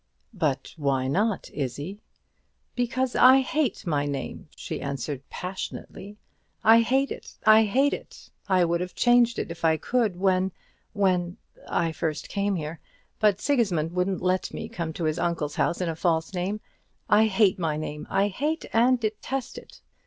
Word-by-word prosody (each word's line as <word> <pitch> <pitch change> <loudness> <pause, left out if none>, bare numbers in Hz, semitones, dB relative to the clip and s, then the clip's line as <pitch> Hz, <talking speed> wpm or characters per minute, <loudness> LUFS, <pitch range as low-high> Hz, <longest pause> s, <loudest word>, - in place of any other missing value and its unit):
"But 150 - -1
why 135 -3 0
not, 205 +8 0
Izzie?" 145 - -4 0.8
"Because 250 +1 -1
I 260 +1 +7
hate 265 -4 -1
my 145 -4 0
name," 140 -1 -5
she - - -6
answered, 140 0 -4
passionately. 190 +2 -7 0.5
"I 225 +1 +7
hate 265 +4 +1
it; - - -8
I 220 0 +7
hate 265 +7 +2
it! - - -9 0.2
I 185 -2 +4
would 170 +1 0
have 180 0 -5
changed 240 -1 +4
it - - -3
if 170 - -9
I 160 -1 +4
could 225 +2 0
when 190 0 +1 0.4
when 180 -3 +1 0.3
I 165 -1 +1
first 155 -1 -3
came 200 0 0
here; 160 -1 -5 0.4
but 210 -2 +3
Sigismund 195 - +1
wouldn't 180 +1 -1
let 185 0 0
me 220 - -5
come 170 -8 -4
to 170 - -5
his 155 0 0
uncle's 160 -4 -2
house 175 - +1
in 180 - 0
a 165 - -2
false 165 +1 0
name. 190 +4 -2 0.5
I 215 +1 +5
hate 195 -2 +3
my 160 -3 -1
name; 150 -1 -5
I 200 +1 +2
hate 300 - -2
and 245 +2 +4
detest 235 - -3
it." - - -17
185 Hz, 165 wpm, -26 LUFS, 165-225 Hz, 0.8 s, I